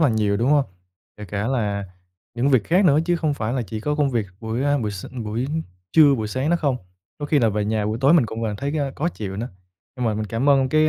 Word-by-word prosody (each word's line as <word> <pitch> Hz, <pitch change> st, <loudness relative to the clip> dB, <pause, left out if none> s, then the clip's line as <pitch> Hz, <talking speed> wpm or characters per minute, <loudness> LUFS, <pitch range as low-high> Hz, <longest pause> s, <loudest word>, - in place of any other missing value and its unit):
là 155 Hz, -, +5 dB
nhiều, 105 Hz, -3 st, +1 dB
đúng 120 Hz, +5 st, +1 dB
hông? 145 Hz, -2 st, +4 dB, 0.5 s
Kể 105 Hz, -, -8 dB
cả 100 Hz, +3 st, -3 dB
là 105 Hz, -6 st, -1 dB, 0.5 s
những 125 Hz, +4 st, +1 dB
việc 130 Hz, -7 st, +3 dB
khác 185 Hz, +4 st, +3 dB
nữa 150 Hz, -3 st, +5 dB
chứ 175 Hz, 0 st, +1 dB
không 155 Hz, -3 st, 0 dB
phải 110 Hz, -3 st, -2 dB
là 125 Hz, -2 st, 0 dB
chỉ 110 Hz, +1 st, -6 dB
có 150 Hz, +5 st, -1 dB
công 145 Hz, -2 st, +1 dB
việc 115 Hz, -4 st, -1 dB
buổi, 115 Hz, +3 st, -2 dB
à, 145 Hz, 0 st, +2 dB
buổi 110 Hz, -5 st, -2 dB
s 100 Hz, -2 st, -7 dB, 0.2 s
buổi 115 Hz, +5 st, -2 dB, 0.5 s
trưa, 150 Hz, -3 st, +7 dB
buổi 110 Hz, -4 st, -2 dB
sáng 130 Hz, +8 st, -1 dB
đó 175 Hz, -, +4 dB
không, 140 Hz, -6 st, 0 dB, 0.4 s
có 145 Hz, -, -4 dB
khi 145 Hz, 0 st, +3 dB
là 115 Hz, -4 st, +3 dB
về 105 Hz, 0 st, -1 dB
nhà 105 Hz, 0 st, 0 dB
buổi 110 Hz, +2 st, -2 dB
tối 140 Hz, +4 st, +5 dB
mình 155 Hz, -9 st, +5 dB
cũng 110 Hz, +1 st, -6 dB
vẫn 105 Hz, -2 st, -2 dB
thấy 140 Hz, +6 st, -3 dB
cái, 155 Hz, -, -1 dB
ơ, 135 Hz, -1 st, -2 dB
khó 165 Hz, +4 st, 0 dB
chịu 100 Hz, -, -6 dB
nữa. 120 Hz, +4 st, -3 dB, 0.5 s
Nhưng 125 Hz, -, -2 dB
mà 110 Hz, -, +1 dB
mình 110 Hz, 0 st, -3 dB
cảm 115 Hz, +7 st, -1 dB
ơn 135 Hz, -2 st, +4 dB
cái 155 Hz, +2 st, +4 dB
125 Hz, 280 wpm, -22 LUFS, 110-145 Hz, 0.5 s, trưa